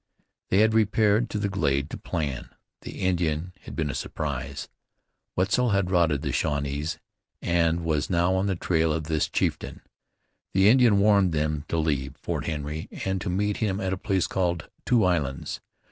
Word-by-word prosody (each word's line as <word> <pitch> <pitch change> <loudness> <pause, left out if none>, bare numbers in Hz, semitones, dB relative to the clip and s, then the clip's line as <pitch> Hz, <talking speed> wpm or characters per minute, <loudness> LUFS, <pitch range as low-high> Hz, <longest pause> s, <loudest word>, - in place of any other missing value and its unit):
They 95 - +4
had 110 0 +4
repaired 110 +1 +3
to - - -3
the 100 -1 0
glade 70 -7 0
to - - -5
plan. 75 -7 -3 0.3
The - - -8
Indian 90 -2 0
had - - -8
been 75 -3 -1
a - - -7
surprise. 70 -2 -4 0.7
Wetzel 100 +7 +2
had 100 -3 +1
routed 85 -5 +2
the 70 - -1
Shawnees, 70 +2 -1 0.4
and 85 -1 +1
was 75 -2 0
now 85 +1 +2
on 95 +1 +1
the 95 - 0
trail 80 -2 +1
of 80 +1 -1
this 80 0 0
chieftain. - - -2 0.7
The 95 +2 +5
Indian 120 -4 +5
warned 100 -3 +4
them 75 -1 -1
to 85 - -1
leave 70 -3 -1
Fort - - -4
Henry 75 0 -4 0.2
and 95 -1 -1
to 100 - -3
meet 100 +3 0
him 100 -3 -1
at 95 -2 -1
a - - +1
place 95 -2 0
called 85 -4 -1 0.2
Two 120 -3 +4
Islands. 75 -7 -1
85 Hz, 175 wpm, -26 LUFS, 75-100 Hz, 0.7 s, The